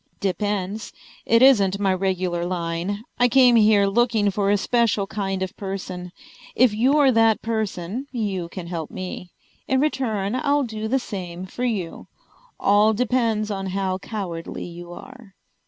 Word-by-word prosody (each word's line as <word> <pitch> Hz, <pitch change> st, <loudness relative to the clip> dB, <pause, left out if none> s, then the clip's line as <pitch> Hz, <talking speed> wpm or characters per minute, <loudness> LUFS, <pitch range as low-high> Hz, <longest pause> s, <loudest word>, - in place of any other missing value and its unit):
"Depends. 205 Hz, +1 st, -2 dB, 0.3 s
It 230 Hz, +2 st, +5 dB
isn't 200 Hz, -8 st, +5 dB
my 195 Hz, -2 st, +2 dB
regular 185 Hz, -2 st, -1 dB
line. 175 Hz, +3 st, -3 dB, 0.2 s
I 245 Hz, -, +5 dB
came 250 Hz, -1 st, +5 dB
here 210 Hz, -2 st, +5 dB
looking 215 Hz, 0 st, +2 dB
for 200 Hz, 0 st, 0 dB
a 205 Hz, -, +4 dB
special 230 Hz, -2 st, +1 dB
kind 195 Hz, -2 st, -3 dB
of 190 Hz, -, -6 dB
person. 185 Hz, -2 st, -6 dB, 0.4 s
If 250 Hz, -3 st, +4 dB
you're 270 Hz, +5 st, +4 dB
that 225 Hz, -2 st, +3 dB
person 220 Hz, +1 st, -3 dB
you 200 Hz, -8 st, -3 dB
can 180 Hz, -1 st, -7 dB
help 170 Hz, -3 st, -5 dB
me. 185 Hz, -1 st, -7 dB, 0.4 s
In 265 Hz, -, +2 dB
return 225 Hz, -8 st, -1 dB
I'll 285 Hz, +2 st, +1 dB
do 220 Hz, -3 st, -4 dB
the 260 Hz, +4 st, +2 dB
same 185 Hz, -7 st, -6 dB
for 245 Hz, +6 st, -4 dB
you. 200 Hz, -9 st, -3 dB, 0.5 s
All 210 Hz, +2 st, +4 dB
depends 225 Hz, -2 st, 0 dB
on 195 Hz, -1 st, -3 dB
how 190 Hz, -1 st, -1 dB
cowardly 185 Hz, -6 st, -5 dB
you 175 Hz, 0 st, -9 dB
are." 225 Hz, +2 st, -12 dB
205 Hz, 150 wpm, -23 LUFS, 185-230 Hz, 0.5 s, It